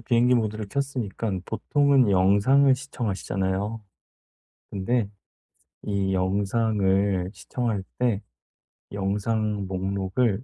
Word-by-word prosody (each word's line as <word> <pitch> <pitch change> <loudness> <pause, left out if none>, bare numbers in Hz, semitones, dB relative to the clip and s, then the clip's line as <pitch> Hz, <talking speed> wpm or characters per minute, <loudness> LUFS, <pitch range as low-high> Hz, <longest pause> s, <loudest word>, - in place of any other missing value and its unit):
비행기 120 +1 +3
모드를 110 -3 -1
켰으니깐 115 -7 -2
보통은 140 0 +2
영상을 100 +9 +4
시청하시잖아요. 105 -4 -3 0.9
근데 105 +3 0 0.8
이 100 -2 -1
영상을 95 -1 +1
시청할 115 -6 -3 0.2
때 115 -5 +1 0.7
영상 105 +1 -1
목록을 95 +4 -1
105 Hz, 220 characters per minute, -25 LUFS, 95-120 Hz, 0.9 s, 영상을